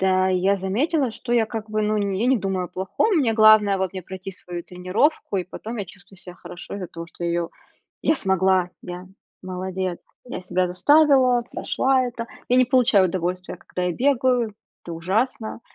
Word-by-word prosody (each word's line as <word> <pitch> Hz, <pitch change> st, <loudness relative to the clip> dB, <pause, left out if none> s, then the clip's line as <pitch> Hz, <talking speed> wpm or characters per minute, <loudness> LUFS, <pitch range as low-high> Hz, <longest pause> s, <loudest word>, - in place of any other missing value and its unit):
Да, 190 Hz, 0 st, +3 dB
я 190 Hz, +2 st, +2 dB
заметила, 255 Hz, -, 0 dB
что 240 Hz, +2 st, -5 dB
я, 230 Hz, -2 st, +3 dB
как 220 Hz, -1 st, -6 dB
бы, 215 Hz, 0 st, 0 dB
ну, 215 Hz, 0 st, +1 dB
я 200 Hz, +2 st, 0 dB
не 260 Hz, 0 st, +4 dB
думаю 190 Hz, -2 st, -2 dB
о -, -, -7 dB
плохом, 190 Hz, -, 0 dB
мне 235 Hz, -6 st, +2 dB
главное, 215 Hz, -3 st, +6 dB
вот, 190 Hz, 0 st, -1 dB
мне 185 Hz, -1 st, -6 dB
пройти 190 Hz, +2 st, -8 dB
свою 175 Hz, -1 st, -8 dB
тренировку 190 Hz, -, 0 dB
и 180 Hz, -, -1 dB
потом 225 Hz, +5 st, -7 dB
я 205 Hz, -, -3 dB
чувствую 190 Hz, +1 st, -17 dB
себя 180 Hz, -2 st, -11 dB
хорошо 175 Hz, 0 st, -10 dB
из-за 185 Hz, -3 st, -5 dB
того 165 Hz, 0 st, -8 dB
её, 170 Hz, 0 st, -1 dB, 0.5 s
я 315 Hz, -, +3 dB
смогла, 190 Hz, -4 st, +2 dB
я 180 Hz, +1 st, -7 dB, 0.3 s
молодец, 185 Hz, -1 st, -4 dB, 0.3 s
я 245 Hz, -6 st, -6 dB
себя 180 Hz, 0 st, 0 dB
заставила, 255 Hz, -, +4 dB
прошла 260 Hz, -1 st, +1 dB
это. 240 Hz, -1 st, -5 dB, 0.2 s
Я 250 Hz, -, +3 dB
не 255 Hz, -, +5 dB
получаю 235 Hz, -7 st, +4 dB
удовольствия, 180 Hz, +1 st, -3 dB
когда 180 Hz, -, -5 dB
я 180 Hz, -, +1 dB
бегаю, 250 Hz, -3 st, +1 dB, 0.3 s
это 170 Hz, -, -6 dB
ужасно. 220 Hz, +7 st, -2 dB
195 Hz, 180 wpm, -23 LUFS, 185-240 Hz, 0.5 s, главное